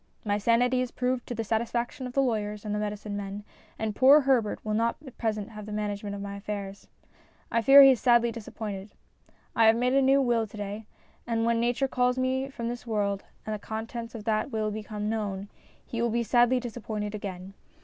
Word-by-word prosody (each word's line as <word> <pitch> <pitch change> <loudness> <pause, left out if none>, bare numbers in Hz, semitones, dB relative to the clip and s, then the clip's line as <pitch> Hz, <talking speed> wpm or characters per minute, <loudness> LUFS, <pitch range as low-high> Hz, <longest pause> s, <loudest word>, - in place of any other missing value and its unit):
My 205 0 +1
sanity 245 +4 +3
is 255 - -2
proved 250 0 -2
to 240 - -4
the 225 - -2
satisfaction 235 +4 -2
of 250 - -9
the 275 - +3
lawyers 210 -4 -2
and 210 - -2
the 210 - -1
medicine 210 0 -4
men, 200 0 -5 0.3
and 220 -1 -3
poor 275 +3 +7
Herbert 255 -6 +1
will 215 - -1
not 230 +2 +1
at 260 - -11
present 215 -3 -2
have 210 -1 -9
the - - -7
management 205 -1 -3
of 200 - -6
my 200 0 -6
affairs. 200 -1 -6 0.6
I 230 - +2
fear 275 +3 +9
he 270 - +9
is 255 - +1
sadly 235 -2 +4
disappointed. 210 -3 -7 0.6
I 225 -2 +5
have 220 - +6
made 250 +2 +1
a 275 - +4
new 270 +1 +4
will 240 -4 +1
to 210 - -12
day, 205 +1 -5 0.4
and 230 -1 0
when 235 0 +2
nature 245 +3 +1
calls 250 -1 +1
me 260 +1 0
from 235 -3 -5
this 240 +1 -5
world 200 -3 -1 0.2
and 215 - -3
the 210 - -4
contents 225 +2 -6
of 220 - -7
that 215 +3 0
will 215 -3 -1
become 210 0 -5
known, 205 -3 -3 0.4
he 230 - -4
will 235 - +2
be 235 +1 0
sadly 245 +2 +3
disappointed 220 -3 -5
again. 195 -2 -6
225 Hz, 210 wpm, -28 LUFS, 210-245 Hz, 0.6 s, fear